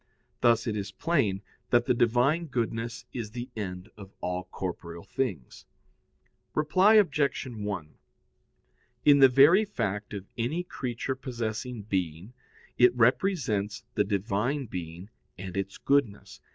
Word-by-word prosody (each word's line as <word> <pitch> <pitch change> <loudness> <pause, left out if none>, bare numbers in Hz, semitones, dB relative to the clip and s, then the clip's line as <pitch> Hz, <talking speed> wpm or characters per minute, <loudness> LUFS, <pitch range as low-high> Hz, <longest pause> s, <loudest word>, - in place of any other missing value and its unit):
Thus 115 -1 +3
it 110 - -1
is 100 -1 -4
plain 110 - 0 0.3
that 120 -1 +3
the - - +3
Divine 125 +8 +2
goodness 120 -2 -3
is 115 -4 -4
the 120 +3 -7
end 90 -3 -5
of 100 -2 -12
all 90 +1 -3
corporeal 85 -2 -6
things. 100 - -4 0.9
Reply 185 +8 +4
Obj. 150 -11 +3
1: 105 -10 -5 1.1
In 145 -1 +7
the 135 -1 +8
very 145 - +6
fact 105 - -3
of 100 -1 -6
any 155 +10 -1
creature 130 -6 -4
possessing 120 -3 -4
being, 95 0 -3 0.5
it 125 0 +6
represents 120 - +1
the - - +2
Divine 105 +7 -1
being 90 0 -7 0.3
and 95 0 -7
Its 95 0 -3
goodness. 140 -8 0
115 Hz, 125 wpm, -28 LUFS, 100-135 Hz, 1.1 s, the